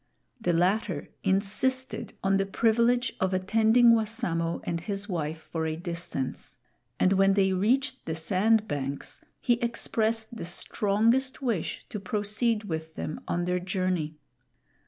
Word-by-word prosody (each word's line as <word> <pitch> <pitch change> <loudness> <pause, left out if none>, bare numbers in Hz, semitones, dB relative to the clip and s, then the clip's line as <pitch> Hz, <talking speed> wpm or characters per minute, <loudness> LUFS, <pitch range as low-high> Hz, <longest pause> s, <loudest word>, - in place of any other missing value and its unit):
The 175 - +1
latter 180 -1 +1
insisted 255 +7 +1
on 195 0 +3
the 195 - +1
privilege 235 +4 +2
of 190 0 +1
attending 220 +5 +5
Wassamo 210 -7 0
and 170 -1 -2
his 200 +2 -3
wife 160 -5 -2
for 160 0 -4
a 155 - -2
distance, 170 -6 -4 0.4
and 185 - +4
when 195 0 +4
they 190 -1 +3
reached 245 +9 +1
the 160 - -1
sand 210 +6 +2
banks 140 -1 -4 0.2
he 240 0 +1
expressed 225 -1 -1
the 220 - -5
strongest 225 +9 +1
wish 225 -10 -2
to 210 - -4
proceed 210 +1 -1
with 160 -4 -5
them 155 - -5
on 175 0 -1
their 180 0 0
journey. 180 -4 -1
195 Hz, 135 wpm, -28 LUFS, 175-225 Hz, 0.4 s, attending